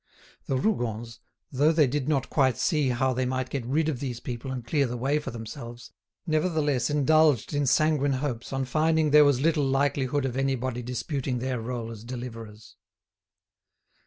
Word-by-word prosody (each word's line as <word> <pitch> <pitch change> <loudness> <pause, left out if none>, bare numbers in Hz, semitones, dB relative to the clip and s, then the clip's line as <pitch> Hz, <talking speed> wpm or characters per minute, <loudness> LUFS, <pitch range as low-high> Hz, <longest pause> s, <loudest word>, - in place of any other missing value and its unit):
The 135 - 0
Rougons, 120 - -2 0.3
though 145 +3 +3
they 155 -2 +4
did 140 +2 -2
not 135 -4 +1
quite 130 -5 +2
see 150 -6 +1
how 130 +1 +1
they 130 0 -1
might 130 0 -2
get 135 -3 -2
rid 150 +4 +1
of 145 -6 -2
these 125 -4 -4
people 120 +1 -6
and 125 -3 -5
clear 140 +2 +1
the 120 +1 -4
way 140 +5 +1
for 150 - -6
themselves, 120 +1 -8 0.3
nevertheless 155 -6 +1
indulged 150 -2 +3
in 145 -1 0
sanguine 145 0 +2
hopes 130 -3 -3
on 135 0 -1
finding 155 +3 +2
there 150 0 +8
was 140 -3 +3
little 155 -1 +2
likelihood 135 0 +1
of 125 -2 -3
anybody 130 -2 -1
disputing 125 +2 -3
their 125 -1 -2
role 115 -1 -4
as 110 -2 -9
deliverers. 115 -3 -8
130 Hz, 170 wpm, -27 LUFS, 120-145 Hz, 0.3 s, there